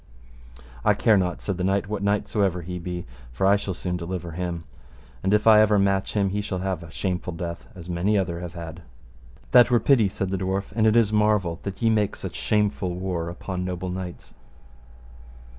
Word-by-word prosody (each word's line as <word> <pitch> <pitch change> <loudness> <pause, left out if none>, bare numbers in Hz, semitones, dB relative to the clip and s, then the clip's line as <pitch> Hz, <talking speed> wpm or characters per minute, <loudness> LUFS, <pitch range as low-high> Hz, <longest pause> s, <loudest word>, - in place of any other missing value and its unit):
I - - +4
care 110 - +4
not, 90 -3 0
said 100 -3 -3
the 90 - -2
knight, 100 +1 +1
what 105 -1 -3
knight 100 0 +1
so 105 - -1
ever 90 -3 +1
he 90 +1 -5
be, 90 0 -5 0.3
for - - -1
I 100 +1 +6
shall 100 -2 -3
soon 90 0 -3
deliver 85 0 -5
him. 85 0 -4 0.6
And 95 - 0
if 105 0 +3
I 110 -1 +8
ever 105 -1 +4
match 100 0 +1
him 100 -2 +2
he 105 +1 -1
shall 100 -2 -3
have 95 -1 -2
a 85 - -10
shameful 90 +1 -3
death 85 0 -6
as 90 -2 -10
many 90 +4 +1
other 85 -3 -1
have 90 0 -7
had. 85 0 -7 0.7
That 125 0 +7
were 120 -1 +4
pity, 115 -7 +4
said 95 0 -3
the 95 - -1
dwarf, 95 +2 -2
and 110 -1 +3
it 110 - +4
is 110 -3 +4
marvel 105 -6 +2
that 100 +2 -6
ye 115 - +4
make 105 -2 +1
such - - -6
shameful 105 -4 0
war 90 -2 -3
upon 90 +1 -5
noble 90 0 -3
knights. 90 -1 -7
95 Hz, 210 wpm, -25 LUFS, 90-105 Hz, 0.7 s, I